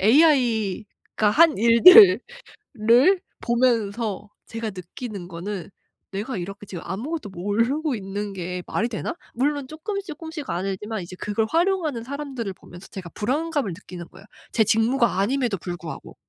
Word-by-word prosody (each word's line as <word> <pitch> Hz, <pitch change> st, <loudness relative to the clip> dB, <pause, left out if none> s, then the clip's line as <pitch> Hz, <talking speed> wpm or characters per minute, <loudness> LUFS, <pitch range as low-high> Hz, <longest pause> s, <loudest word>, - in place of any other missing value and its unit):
AI가 220 Hz, -, +2 dB
한 315 Hz, +6 st, +5 dB
일들을 365 Hz, -, +9 dB, 1.2 s
보면서 225 Hz, -4 st, 0 dB, 0.2 s
제가 225 Hz, -1 st, -4 dB
느끼는 190 Hz, +1 st, -8 dB
거는 185 Hz, +2 st, -6 dB, 0.4 s
'내가 205 Hz, +4 st, -4 dB
이렇게 195 Hz, +3 st, -7 dB
지금 175 Hz, -3 st, -7 dB
아무것도 230 Hz, -, -4 dB
모르고 230 Hz, -, -1 dB
있는 200 Hz, 0 st, -5 dB
게 180 Hz, -1 st, -4 dB
말이 230 Hz, -, 0 dB
되나?' 240 Hz, +9 st, -4 dB, 0.2 s
물론 280 Hz, +2 st, -1 dB
쪼끔 330 Hz, +7 st, -5 dB
쪼끔씩 320 Hz, -3 st, -7 dB
알지만 195 Hz, +3 st, -3 dB
이제 180 Hz, +1 st, -9 dB
그걸 210 Hz, +1 st, -1 dB
활용하는 330 Hz, -7 st, 0 dB
사람들을 265 Hz, -5 st, -5 dB
보면서 180 Hz, 0 st, -14 dB
제가 180 Hz, -3 st, -8 dB
불안감을 285 Hz, -, -1 dB
느끼는 175 Hz, -1 st, -10 dB
거예요 190 Hz, +2 st, -16 dB, 0.3 s
제 225 Hz, -, +3 dB
직무가 225 Hz, 0 st, +2 dB
아님에도 235 Hz, 0 st, 0 dB
불구하고. 175 Hz, -2 st, -7 dB
225 Hz, 320 characters per minute, -24 LUFS, 195-275 Hz, 1.2 s, 일들을